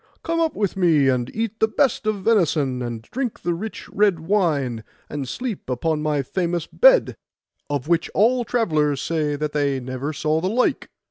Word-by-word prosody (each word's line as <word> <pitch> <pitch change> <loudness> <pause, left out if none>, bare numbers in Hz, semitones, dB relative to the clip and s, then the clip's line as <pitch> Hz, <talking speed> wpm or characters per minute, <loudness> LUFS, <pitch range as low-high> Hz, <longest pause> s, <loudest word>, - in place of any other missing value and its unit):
Come 330 0 -1
up 325 -2 +1
with 200 -3 -1
me, 160 -7 +3
and 125 -2 0
eat 225 0 -3
the 220 - +4
best 250 -2 0
of 205 -3 -1
venison, 155 - +2
and 120 -2 -5
drink 250 - -4
the 175 0 0
rich 210 +6 -6
red 200 -5 +2
wine, 155 - 0 0.2
and 140 -3 -5
sleep 235 - -5
upon 150 +5 -1
my 150 -2 0
famous 175 +3 -2
bed, - - +4 0.5
of 145 -1 -2
which 170 -1 +1
all 240 +5 +3
travellers 155 - +1
say 150 -2 -1
that 150 +1 -3
they 140 -2 0
never 130 +3 -4
saw 155 +1 0
the 185 - 0
like. 245 +5 0
165 Hz, 180 wpm, -22 LUFS, 145-215 Hz, 0.5 s, the